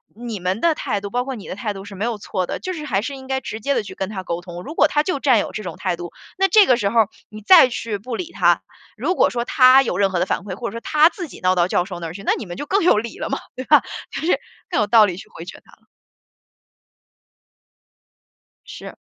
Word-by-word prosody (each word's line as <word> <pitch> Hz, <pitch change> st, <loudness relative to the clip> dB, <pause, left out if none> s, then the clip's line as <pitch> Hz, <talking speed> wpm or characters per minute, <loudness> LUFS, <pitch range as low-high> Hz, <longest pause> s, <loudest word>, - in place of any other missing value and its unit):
你 230 Hz, -2 st, -6 dB
们 185 Hz, +4 st, -2 dB
的 335 Hz, -2 st, +3 dB
态 215 Hz, -9 st, -3 dB
度， 200 Hz, -, -5 dB
包 245 Hz, +3 st, -1 dB
括 270 Hz, -, -4 dB
你 220 Hz, -6 st, -9 dB
的 -, -, -5 dB
态 210 Hz, 0 st, -3 dB
度 195 Hz, 0 st, -9 dB
是 205 Hz, -, -10 dB
没 200 Hz, +4 st, -2 dB
有 230 Hz, -3 st, -3 dB
错 185 Hz, -2 st, -3 dB
的， -, -, -5 dB
就 370 Hz, -, -4 dB
是 305 Hz, -3 st, -6 dB
还 200 Hz, -8 st, 0 dB
是 275 Hz, +6 st, -5 dB
应 265 Hz, -1 st, -11 dB
该 265 Hz, 0 st, -2 dB
直 220 Hz, -, -6 dB
接 280 Hz, +6 st, 0 dB
地 -, -, +1 dB
去 205 Hz, -, -10 dB
跟 190 Hz, -, -3 dB
他 200 Hz, -2 st, -5 dB
沟 175 Hz, -1 st, -4 dB
通。 175 Hz, -1 st, -9 dB
如 305 Hz, -, -8 dB
果 300 Hz, -, +5 dB
他 295 Hz, -, +1 dB
就 305 Hz, -2 st, -2 dB
占 260 Hz, -5 st, +4 dB
有 -, -, -3 dB
这 215 Hz, -, -6 dB
种 175 Hz, -4 st, -6 dB
态 -, -, -1 dB
度， 175 Hz, 0 st, -8 dB, 0.3 s
那 385 Hz, -, +3 dB
这 405 Hz, +2 st, +6 dB
个 250 Hz, -, +4 dB
时 205 Hz, -4 st, 0 dB
候 230 Hz, +2 st, +2 dB
儿 215 Hz, -, -1 dB, 0.2 s
你 215 Hz, 0 st, -10 dB
再 320 Hz, -, +8 dB
去 230 Hz, -3 st, -4 dB
不 230 Hz, +4 st, -6 dB
理 345 Hz, +7 st, -6 dB
他， -, -, +3 dB, 0.3 s
如 365 Hz, -, -1 dB
果 -, -, +3 dB
说 240 Hz, -1 st, -2 dB
他 255 Hz, +2 st, +6 dB
有 230 Hz, -9 st, -2 dB
任 195 Hz, -1 st, +2 dB
何 180 Hz, -, -1 dB
的 180 Hz, -, 0 dB
反 -, -, -1 dB
馈， 195 Hz, 0 st, -7 dB
或 235 Hz, +4 st, -4 dB
者 -, -, -12 dB
说 -, -, -7 dB
他 305 Hz, +5 st, +4 dB
自 355 Hz, -1 st, -7 dB
己 -, -, -13 dB
闹 185 Hz, 0 st, +2 dB
到 175 Hz, -1 st, +2 dB
教 180 Hz, -, +1 dB
授 180 Hz, -2 st, -7 dB
那 170 Hz, -, -6 dB
儿 160 Hz, -, -7 dB
去， 195 Hz, -, -9 dB
那 -, -, +1 dB
你 -, -, -6 dB
们 175 Hz, -1 st, -8 dB
就 290 Hz, -, -6 dB
更 400 Hz, 0 st, +1 dB
有 330 Hz, -11 st, +4 dB
理 230 Hz, +1 st, -7 dB
了 -, -, -4 dB
嘛， -, -, -2 dB, 0.2 s
对 255 Hz, -, -6 dB
吧， -, -, +6 dB, 0.3 s
就 -, -, -5 dB
是 330 Hz, +3 st, +1 dB, 0.3 s
更 -, -, 0 dB
有 210 Hz, -, +2 dB
道 215 Hz, +1 st, +6 dB
理 180 Hz, -4 st, -3 dB
去 -, -, -11 dB
回 165 Hz, -, -9 dB
绝 180 Hz, -, -10 dB
他 -, -, -21 dB
了。 -, -, -24 dB, 2.8 s
是。 -, -, -9 dB
220 Hz, 310 characters per minute, -21 LUFS, 190-270 Hz, 2.8 s, 再